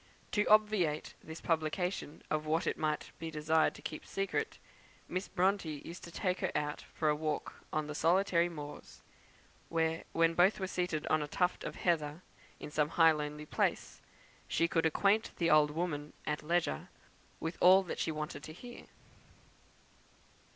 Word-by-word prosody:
To 210 0 +2
obviate 210 -8 +3
this 160 0 -8
publication 165 0 -1
of 155 0 0
what 160 +2 +1
it - - 0
might 155 -1 -2
be 165 - -4
desirable 155 +1 +2
to - - -11
keep 155 - -5
secret, 195 0 -2 0.5
Miss 185 +2 -3
Bronte 180 -5 0
used 170 +2 -8
to - - -9
take 180 +1 -1
her 190 - -1
out 150 0 -1
for 155 - 0
a 150 - +3
walk 155 0 -3
on 155 0 0
the 150 - -5
solitary 175 +2 +3
moors; 150 -3 -9 0.7
where, 165 0 0
when 165 0 +3
both 180 +5 +4
were 190 - -1
seated 180 -4 -2
on 155 - +2
a 150 - -3
tuft 180 +4 0
of - - -5
heather, 160 -1 0 0.4
in - - -7
some 150 0 +1
high 165 -1 +6
lonely 150 0 -4
place, - - -1 0.5
she 165 - +2
could 165 -2 +2
acquaint 200 +7 +2
the 170 -1 +2
old 150 -1 +6
woman, 150 -2 -3
at 150 0 -1
leisure, 165 - 0 0.5
with 165 +1 -4
all 190 +2 +8
that 180 - -5
she 160 - 0
wanted 150 -1 -4
to 155 - -8
hear. 240 +8 -11
160 Hz, 165 wpm, -33 LUFS, 150-180 Hz, 0.7 s, all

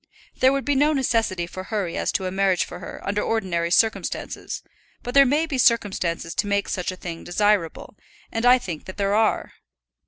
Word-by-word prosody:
There 260 - +5
would 275 0 -1
be 290 - +2
no 295 +3 +3
necessity 225 - 0
for 185 +2 -8
hurry 190 -5 -3
as - - -1
to 190 - -1
a 185 - -2
marriage 190 -1 +2
for - - -9
her - - -9
under 205 +1 0
ordinary 180 -6 -1
circumstances, 220 +5 -1 0.4
but 245 - -5
there 275 0 +7
may 295 +5 +2
be 285 -5 -3
circumstances 190 -8 +1
to - - -1
make 200 0 0
such 180 0 -2
a - - -7
thing 170 -2 -7
desirable, 205 -1 0 0.4
and 225 - -2
I 250 +1 +7
think 175 -10 -7
that 185 - -9
there 200 0 0
are." 220 +1 +1
205 Hz, 195 wpm, -23 LUFS, 185-245 Hz, 0.4 s, there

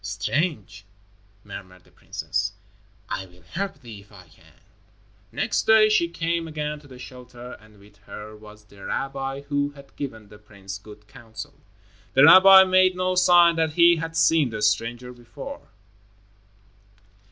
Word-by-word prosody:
"Strange," 100 - -3 0.6
murmured 95 -3 -12
the - - -26
princess. - - -4 0.5
"I 95 - -5
will 90 -1 -22
help 190 - -6
thee 115 -5 -11
if 100 +1 -20
I 95 -4 -16
can." 80 - -23 0.8
Next - - -2
day 220 -1 +6
she 170 -6 +2
came 170 0 -3
again 150 -1 -5
to 145 - -18
the 130 -2 -13
shelter, 125 -1 -12
and 110 -1 -20
with 100 +1 -21
her 110 +1 -10
was 105 0 -15
the 100 -2 -17
rabbi 135 +4 -4
who 145 0 -2
had 140 -1 -17
given 110 -7 -8
the 105 0 -15
prince 100 -2 -10
good 105 0 -16
counsel. 110 +1 -11 0.6
The 135 - +6
rabbi 190 +4 +9
made 185 0 +3
no 185 0 -1
sign 175 -2 +4
that 160 -2 0
he 170 +1 +5
had 165 0 -6
seen 160 -6 +3
the 105 -2 -5
stranger 115 +4 -1
before. 120 - -11
125 Hz, 150 wpm, -23 LUFS, 105-165 Hz, 0.8 s, rabbi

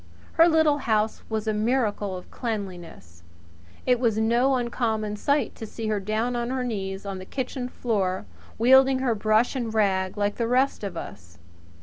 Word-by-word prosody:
Her 330 - +6
little 315 -2 +3
house 220 -4 0
was 220 -1 -2
a 215 - +1
miracle 210 -3 0
of 180 - -12
cleanliness. 180 - -6 0.6
It 250 -1 +3
was 230 -4 +1
no 240 +5 +3
uncommon 225 -4 -1
sight 285 +7 0
to 220 - -6
see 220 +1 -5
her 210 -1 0
down 215 +5 -1
on 240 0 -2
her 260 0 -1
knees 195 -5 -4
on 195 -1 -4
the - - -7
kitchen 255 0 -4
floor, 195 - -1 0.3
wielding 265 +3 +6
her 260 -2 +1
brush 215 +4 +2
and 240 -4 -2
rag 195 -3 +1
like 205 0 0
the 230 - 0
rest 255 0 +1
of 190 -4 -4
us. 85 - -9
220 Hz, 175 wpm, -25 LUFS, 205-250 Hz, 0.6 s, Her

